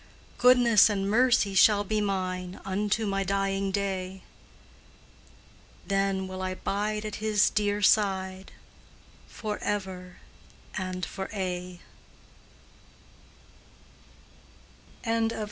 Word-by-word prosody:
Goodness 245 -4 +6
and 195 -2 -1
mercy 225 -2 +3
shall 205 +1 +5
be 215 +1 -1
mine 185 -2 -3
Unto 205 +3 -1
my 195 -1 -1
dying 195 0 -1
day; 190 -1 -3 1.6
Then 195 -1 0
will 185 0 -6
I 185 0 -3
bide 210 +3 -2
at 215 - -5
His 210 -1 +2
dear 205 -1 0
side 190 -2 +1 0.8
Forever 190 -4 -4 0.6
and 185 -2 -3
for 190 +2 -6
aye! 180 -2 -4
195 Hz, 85 wpm, -27 LUFS, 185-210 Hz, 1.6 s, Goodness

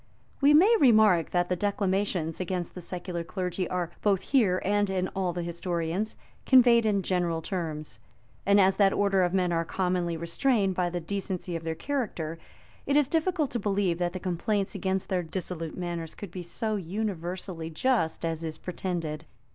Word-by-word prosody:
We 290 +2 +6
may 400 +9 +7
remark, 215 - +5
that 175 0 +1
the 180 - 0
declamations 190 -4 -1
against 180 -1 -3
the 180 - -8
secular 175 0 -4
clergy 180 0 -3
are, 175 -2 -2
both 195 -3 +2
here 210 -10 +3
and 205 0 +2
in 185 -1 -1
all 190 -2 -1
the 175 0 -4
historians, 170 +3 -2 0.3
conveyed 240 -3 +6
in 200 -2 +1
general 175 -3 0
terms; 155 - -4 0.4
and 200 +1 +4
as 190 0 +4
that 195 -2 +4
order 200 -2 +2
of 175 -1 +2
men 180 -2 +1
are 165 -1 +1
commonly 180 -1 -1
restrained 195 +5 +1
by 180 -1 0
the 175 0 -3
decency 185 0 -4
of 165 - -4
their 160 0 -2
character, 165 - -3 0.5
it 280 +1 +3
is 295 -3 +4
difficult 325 -1 0
to 240 - -1
believe 195 -4 0
that 175 -1 0
the 185 - -4
complaints 190 +3 -1
against 190 0 -1
their 185 -1 0
dissolute 165 -1 -5
manners 170 -3 -4
could 200 -5 -8
be 180 - -6
so 215 +5 -2
universally 180 -3 -4
just 165 -1 0
as 165 0 -2
is 160 -1 -4
pretended. 165 -4 -4
185 Hz, 175 wpm, -28 LUFS, 170-205 Hz, 0.5 s, may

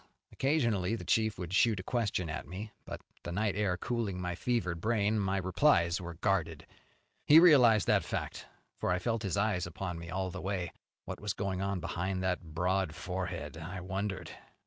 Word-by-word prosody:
Occasionally 115 - +1
the - - -7
chief 110 -2 +2
would 90 0 -5
shoot 105 +1 +4
a - - -5
question 105 -6 -1
at 75 - -5
me; 100 +6 -6
but, - - -7 0.2
the 85 - -6
night 100 +1 0
air 100 -4 +1
cooling 110 -3 -2
my 90 -1 -2
fevered 90 -4 -1
brain, 110 0 +1
my 95 -1 0
replies 95 - +3
were 85 -1 -6
guarded. 85 -4 0 0.6
He 155 +2 +10
realized 125 - +7
that - - +3
fact, - - -4 0.3
for - - -1
I 90 - +2
felt 115 +3 -1
his 100 -1 -1
eyes 100 -4 +1
upon 85 +1 -5
me 85 0 -8
all 95 +1 -2
the - - -6
way. 95 -3 -2 0.3
What - - -6
was 105 -2 -1
going 95 -2 -2
on 100 -1 -1
behind 95 +2 -2
that 90 -1 0
broad 90 +1 -1
forehead, 90 -4 -4
I 90 +3 -6
wondered. 95 +2 -4
95 Hz, 185 wpm, -32 LUFS, 90-105 Hz, 0.6 s, He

